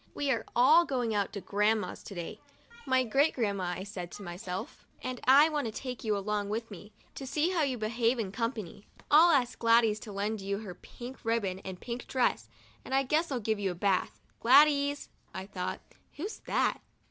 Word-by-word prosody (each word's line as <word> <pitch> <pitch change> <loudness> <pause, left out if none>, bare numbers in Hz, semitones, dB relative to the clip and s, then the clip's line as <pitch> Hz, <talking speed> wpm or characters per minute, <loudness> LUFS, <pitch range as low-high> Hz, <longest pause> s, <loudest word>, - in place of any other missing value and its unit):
We 285 -1 0
are 230 -3 0
all 310 +8 +6
going 250 -7 -1
out 200 -2 0
to 200 - -5
Grandma's 210 +2 0
to 200 - -8
day 170 -1 -6 0.5
('my 260 -1 +3
Great 275 +6 +2
Grandmother,' 195 -6 -1
I - - -4
said 190 -3 -7
to 205 - -8
myself), 185 - -6 0.2
and 255 -1 -4
I 280 +4 +7
want 295 -3 -1
to - - -4
take 250 +2 -6
you 215 -2 0
along 205 0 -2
with 225 +1 -3
me, 205 +2 -11 0.2
to 270 - -7
see 305 +6 +1
how 350 -3 +1
you 270 -4 0
behave 230 +2 0
in 210 -5 -3
com 230 +2 -1
pany. 205 -4 -9 0.3
I'll 320 +4 +8
ask 260 -7 +2
Gladys 230 -2 +4
to 215 - -9
lend 205 +1 -2
you 200 +1 -2
her 205 -3 -7
pink 245 +8 -11
ribbon 220 -5 -1
and 190 -2 -8
pink 245 0 -6
dress, 240 - 0 0.3
and 265 - -3
I 270 - +3
guess 305 +4 0
I'll 255 - -1
give 220 -1 -1
you 200 -1 0
a 180 - -4
bath." 190 +1 0 0.2
'Gladys?" 285 +3 +4 0.3
thought 190 -1 -5
I, - - -29
" - - -39
who's 395 +9 -5
that?" - - +1
225 Hz, 205 wpm, -30 LUFS, 200-265 Hz, 0.5 s, I'll